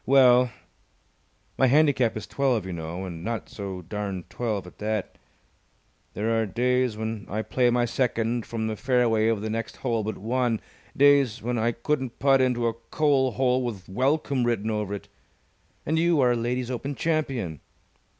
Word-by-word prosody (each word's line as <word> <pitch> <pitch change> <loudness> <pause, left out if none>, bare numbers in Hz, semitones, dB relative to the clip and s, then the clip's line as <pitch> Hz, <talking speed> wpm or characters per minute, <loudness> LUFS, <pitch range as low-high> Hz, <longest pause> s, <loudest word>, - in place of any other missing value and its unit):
"Well, 125 -2 +6 1.1
my 130 - +5
handicap 135 -5 +3
is 105 - -6
twelve, 130 -7 0
you 95 - -5
know, 85 +3 -5
and 85 -2 -7
not 115 +2 -4
so 95 -3 -6
darned 100 0 -5
twelve 110 -6 -2
at 90 - -14
that. 105 -1 -3 1.0
There 115 +2 +1
are 110 - -1
days 125 +2 +1
when 110 -1 -4
I 110 +2 -2
play 125 +1 +2
my 120 0 +2
second 120 -1 -1
from 115 -1 -3
the 110 0 -2
fairway 120 -3 +2
of 115 -3 +1
the 110 - -3
next 115 0 -4
hole 115 -4 -1
but 110 -1 -4
one, 120 +1 0 0.4
days 140 -5 +4
when 120 0 -1
I 115 +2 +2
couldn't 130 0 -2
putt 135 -1 +4
into 125 -2 +1
a 115 - +1
coal 130 +2 +1
hole 130 +1 +2
with 105 -7 -5
'Welcome!' 135 +5 +1
written 110 -2 0
over 105 -2 -2
it. 100 - -9 0.8
And 160 +2 +1
you 170 -2 +3
are 125 -1 +4
a - - +2
Ladies' 120 +2 -2
Open 135 +3 -4
Champion. 135 - -1
120 Hz, 170 wpm, -26 LUFS, 110-130 Hz, 1.1 s, Well